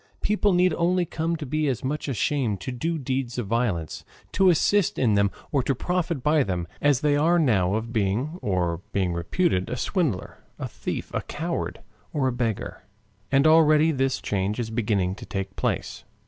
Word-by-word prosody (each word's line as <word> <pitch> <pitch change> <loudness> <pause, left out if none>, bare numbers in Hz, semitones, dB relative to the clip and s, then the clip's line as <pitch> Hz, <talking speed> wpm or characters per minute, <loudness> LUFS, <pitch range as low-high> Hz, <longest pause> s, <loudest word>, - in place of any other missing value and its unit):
People 210 -1 +2
need 180 -1 +3
only 175 +2 +1
come 165 +1 -2
to 155 -2 -5
be 155 +3 0
as 130 -5 -1
much 150 +4 -2
ashamed 125 -4 0
to - - -4
do 160 +7 -2
deeds 130 -3 -3
of 120 - -2
violence, 100 -7 -1 0.3
to 190 -1 +4
assist 180 +2 +2
in 120 -5 +3
them 100 0 +3 0.2
or 140 - +2
to 135 +2 0
profit 170 -2 -2
by 150 0 +4
them, 90 -7 -2
as 145 -3 +3
they 150 -1 +3
now 145 - +3
are - - +2
of 115 +1 -5
being, 115 - -1
or 90 -3 -1
being 95 -3 +1
reputed 90 - 0
a 125 - -3
swindler, 145 - -1 0.2
a - - -4
thief, - - -5
a - - 0
coward, - - -4 0.3
or 140 -3 +1
a - - +1
beggar. 115 -4 -3 0.5
And 140 +1 +4
already 155 0 +6
this 135 -2 0
change 100 +3 -2
is 115 -2 -3
beginning 105 -5 0
to - - -9
take 95 0 -4
place. - - -2
130 Hz, 185 wpm, -25 LUFS, 105-155 Hz, 0.5 s, already